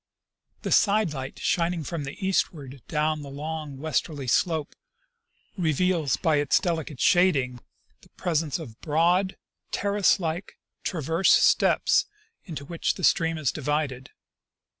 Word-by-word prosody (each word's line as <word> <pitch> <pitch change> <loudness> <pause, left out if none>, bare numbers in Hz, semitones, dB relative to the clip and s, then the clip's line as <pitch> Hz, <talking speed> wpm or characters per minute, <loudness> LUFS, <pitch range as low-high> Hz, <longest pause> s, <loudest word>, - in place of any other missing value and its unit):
The - - -3
side 205 -5 +3
light 135 -1 -6
shining 170 -1 0
from 155 -1 -4
the 140 - -7
eastward 140 -8 -1
down 155 -1 0
the 140 - -8
long 150 0 -5
westerly 150 0 -2
slope 160 +4 0 0.8
reveals 165 -3 +1
by 155 -2 +2
its 145 0 +3
delicate 160 -7 -3
shading 140 -9 +3 0.4
the - - -20
presence 160 -5 0
of 120 -10 -10
broad, 175 +5 +2 0.3
terrace 200 -1 +2
like, 170 +2 -4 0.3
transverse 165 +1 0
steps - - +4 0.4
into 145 -5 -7
which 170 +2 -1
the 185 - -8
stream 165 -1 +3
is 150 -5 0
divided. 145 -3 -2
160 Hz, 125 wpm, -26 LUFS, 145-175 Hz, 0.8 s, steps